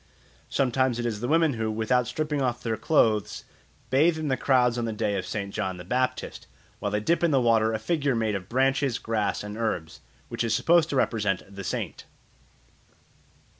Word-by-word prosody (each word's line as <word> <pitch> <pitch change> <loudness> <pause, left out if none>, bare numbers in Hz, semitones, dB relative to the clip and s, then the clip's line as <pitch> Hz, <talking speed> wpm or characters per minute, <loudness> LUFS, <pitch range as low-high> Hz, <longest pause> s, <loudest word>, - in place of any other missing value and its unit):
Sometimes 130 -2 +1
it 120 - -3
is 110 -3 -2
the 120 - -2
women 160 0 +3
who, 110 -1 -2
without 115 +3 +1
stripping 150 +3 -2
off 125 -2 -1
their 115 -1 -1
clothes, 110 -7 +1 0.5
bathe 160 +5 +4
in 150 -4 0
crowds 125 -3 +2
on 120 - -1
the 115 - -2
day 105 -1 -1
of 95 - -3
St. 100 -2 -4
John 95 -1 -2
the 90 - -8
Baptist, 125 +7 -2 0.3
while 105 - -2
they 105 +1 0
dip 170 +11 +1
in 170 - +4
the 140 -3 +3
water 115 -2 +3
a 110 - -1
figure 140 +2 0
made 110 -2 0
of 95 -1 -5
branches, 135 0 +1
grass, 110 -3 -1
and 105 0 -6
herbs, 110 -8 -3 0.3
which - - -3
is 115 -2 +1
supposed 165 +5 +3
to - - -2
represent 105 -7 0
the 100 - -6
saint. - - -4
120 Hz, 190 wpm, -26 LUFS, 110-135 Hz, 0.5 s, bathe